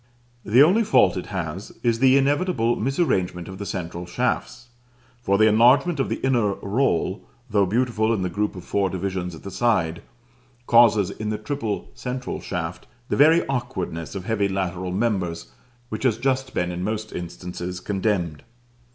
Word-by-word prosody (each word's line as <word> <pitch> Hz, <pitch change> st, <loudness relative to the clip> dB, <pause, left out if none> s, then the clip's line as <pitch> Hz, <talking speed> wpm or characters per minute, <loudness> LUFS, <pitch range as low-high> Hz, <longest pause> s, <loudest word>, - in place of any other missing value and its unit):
The 120 Hz, +6 st, +6 dB
only 195 Hz, +9 st, +4 dB
fault 100 Hz, -, +4 dB
it 90 Hz, -, -5 dB
has 95 Hz, 0 st, -5 dB
is 115 Hz, -2 st, +2 dB
the 130 Hz, +1 st, +5 dB
inevitable 140 Hz, -3 st, +1 dB
misarrangement 95 Hz, -, 0 dB
of 95 Hz, 0 st, -9 dB
the 100 Hz, -, -5 dB
central 85 Hz, -1 st, -5 dB
shafts; 120 Hz, +3 st, -2 dB, 0.5 s
for 100 Hz, -4 st, +2 dB
the 110 Hz, -, +5 dB
enlargement 125 Hz, +9 st, +4 dB
of 135 Hz, -, 0 dB
the -, -, 0 dB
inner 115 Hz, -7 st, +2 dB
roll, 100 Hz, -3 st, 0 dB, 0.3 s
though 100 Hz, -2 st, +3 dB
beautiful 115 Hz, +1 st, +1 dB
in 105 Hz, -5 st, 0 dB
the -, -, 0 dB
group 105 Hz, +3 st, -1 dB
of 90 Hz, -, -8 dB
four 100 Hz, 0 st, 0 dB
divisions 95 Hz, -2 st, -3 dB
at 80 Hz, -, -13 dB
the 100 Hz, -, -7 dB
side, 95 Hz, -8 st, +1 dB, 0.6 s
causes, 115 Hz, -5 st, +5 dB
in 110 Hz, 0 st, -5 dB
the 110 Hz, -, -1 dB
triple 105 Hz, -, -4 dB
central 125 Hz, -, -5 dB
shaft, 90 Hz, -2 st, -5 dB, 0.2 s
the -, -, +1 dB
very 160 Hz, +4 st, +5 dB
awkwardness 95 Hz, -, -4 dB
of 95 Hz, -2 st, -5 dB
heavy 105 Hz, -2 st, +1 dB
lateral 95 Hz, -1 st, -3 dB
members 90 Hz, -, -1 dB, 0.4 s
which 110 Hz, -, -5 dB
has 120 Hz, -5 st, +2 dB
just 130 Hz, +1 st, -1 dB
been 90 Hz, 0 st, 0 dB
in 90 Hz, +1 st, -4 dB
most 110 Hz, +1 st, -3 dB
instances 90 Hz, +1 st, -6 dB
condemned. 95 Hz, -6 st, -1 dB
105 Hz, 165 wpm, -23 LUFS, 90-120 Hz, 0.6 s, The